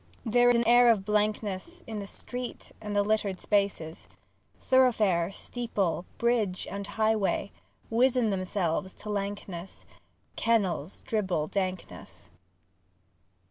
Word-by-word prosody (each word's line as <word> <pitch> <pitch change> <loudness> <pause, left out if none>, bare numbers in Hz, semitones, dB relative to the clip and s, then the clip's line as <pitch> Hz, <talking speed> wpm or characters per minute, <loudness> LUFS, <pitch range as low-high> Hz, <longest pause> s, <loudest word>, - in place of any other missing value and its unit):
II 225 - -3
There 245 +1 +5
is 245 - +5
an 235 0 +2
air 240 +1 +7
of 205 -4 +3
blankness 210 - -1
In 220 -2 -5
the 200 - -6
street 245 +4 -7
and 210 -1 -4
the 205 - +4
littered 205 -3 0
spaces; 180 - -1 0.5
Thoroughfare, 215 -9 +3
steeple, 200 -6 -2
bridge 225 -6 +1
and 200 0 -5
highway 215 -2 0 0.4
Wizen 245 -1 +3
themselves 185 -1 -1
to 210 - -7
lankness; 195 -3 -5 0.5
Kennels 195 -7 0
dribble 185 -8 -1
dankness. 185 - -5
205 Hz, 115 wpm, -28 LUFS, 190-230 Hz, 0.5 s, air